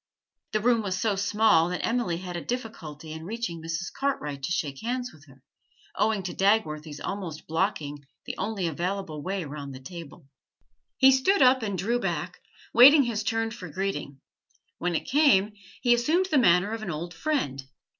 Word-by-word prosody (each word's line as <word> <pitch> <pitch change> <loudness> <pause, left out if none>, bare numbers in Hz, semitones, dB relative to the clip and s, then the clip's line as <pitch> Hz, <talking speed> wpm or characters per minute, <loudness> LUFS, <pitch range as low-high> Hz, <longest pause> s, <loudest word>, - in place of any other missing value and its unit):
The 215 - +2
room 235 0 +3
was 190 -2 -2
so 210 -1 +1
small 205 -4 +3
that 180 - -2
Emily 230 -8 0
had 180 0 -6
a 170 - -4
difficulty 165 -11 -6
in 160 0 -8
reaching 205 -3 -4
Mrs. 165 +3 -4
Cartwright 150 - -2
to 155 - -3
shake 150 -7 -2
hands 250 +1 -3
with 150 -1 -18
her, 135 -1 -19 0.5
owing 215 -2 +1
to 180 - -4
Dagworthy's 155 -7 +1
almost 185 -6 -5
blocking 155 -4 -2 0.2
the - - -5
only 200 -1 -2
available 170 -1 -3
way 190 +1 -3
round 140 -2 -7
the - - -9
table. 165 +1 -10 0.7
He 265 0 +7
stood 265 +8 +4
up 255 0 +5
and 200 -4 -2
drew 230 +7 0
back, - - -3 0.3
waiting 280 +5 +9
his 230 -4 -2
turn 225 +1 -1
for 200 -7 -8
greeting; 150 -6 -4 0.6
when 175 -1 -1
it - - -2
came, 255 -9 +4 0.3
he 240 -1 +5
assumed 320 +11 +2
the 295 - +5
manner 180 -2 +4
of 225 0 -4
an 215 - -5
old 170 +2 -5
friend. 160 - -2
190 Hz, 175 wpm, -27 LUFS, 160-230 Hz, 0.7 s, waiting